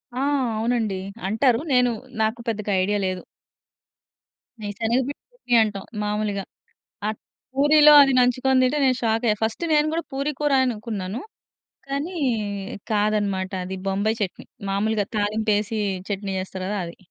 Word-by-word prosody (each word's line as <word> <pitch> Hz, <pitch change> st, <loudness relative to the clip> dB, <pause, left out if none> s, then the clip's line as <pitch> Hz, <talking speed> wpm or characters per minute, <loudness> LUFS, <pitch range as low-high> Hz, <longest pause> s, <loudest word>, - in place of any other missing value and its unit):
ఆ! -, -, -2 dB, 0.4 s
అవునండి. 220 Hz, -4 st, 0 dB, 0.3 s
అంటారు. 230 Hz, +3 st, +3 dB
నేను 250 Hz, -1 st, +4 dB, 0.3 s
నాకు 220 Hz, +2 st, 0 dB
పెద్దగా 215 Hz, -2 st, -2 dB
ఐడియా 205 Hz, +1 st, 0 dB
లేదు. 185 Hz, -1 st, -2 dB, 1.4 s
మేం 205 Hz, -1 st, -3 dB
శనగపిండి 250 Hz, +5 st, 0 dB, 0.2 s
చట్నీ 370 Hz, -, -5 dB
అంటాం 200 Hz, -3 st, -4 dB, 0.2 s
మాములుగా. 210 Hz, -1 st, -1 dB, 0.7 s
అట్ల 215 Hz, -, -5 dB, 0.4 s
పూరిలో 300 Hz, +2 st, +7 dB
అది 275 Hz, -1 st, +4 dB
నంచుకొని 255 Hz, +1 st, +3 dB
తింటే 270 Hz, +4 st, +2 dB
నేను 255 Hz, -1 st, +3 dB
షాక్ 225 Hz, +1 st, +1 dB
అయ్యా. 210 Hz, -, +3 dB
ఫస్ట్ 220 Hz, +9 st, -1 dB
నేను 300 Hz, 0 st, +4 dB
కూడా 335 Hz, 0 st, -1 dB
పూరి 280 Hz, +2 st, -1 dB
కూర 295 Hz, -1 st, +1 dB
అనుకున్నాను 215 Hz, -2 st, -3 dB, 0.7 s
కానీ 290 Hz, +7 st, -3 dB, 0.8 s
కాదన్నమాట 205 Hz, -3 st, +1 dB
అది 190 Hz, +1 st, -5 dB
బొంబాయి 210 Hz, +4 st, 0 dB
చట్నీ. 185 Hz, -, -4 dB, 0.2 s
మాములుగా 210 Hz, +1 st, +1 dB
తాలింపు 215 Hz, +1 st, +1 dB
ఎసి 215 Hz, +1 st, -2 dB, 0.3 s
చట్నీ 195 Hz, -1 st, -2 dB
చేస్తారు 185 Hz, 0 st, -6 dB
కదా 205 Hz, 0 st, -1 dB
అది. 170 Hz, -, -9 dB
220 Hz, 135 wpm, -23 LUFS, 205-255 Hz, 1.4 s, పూరిలో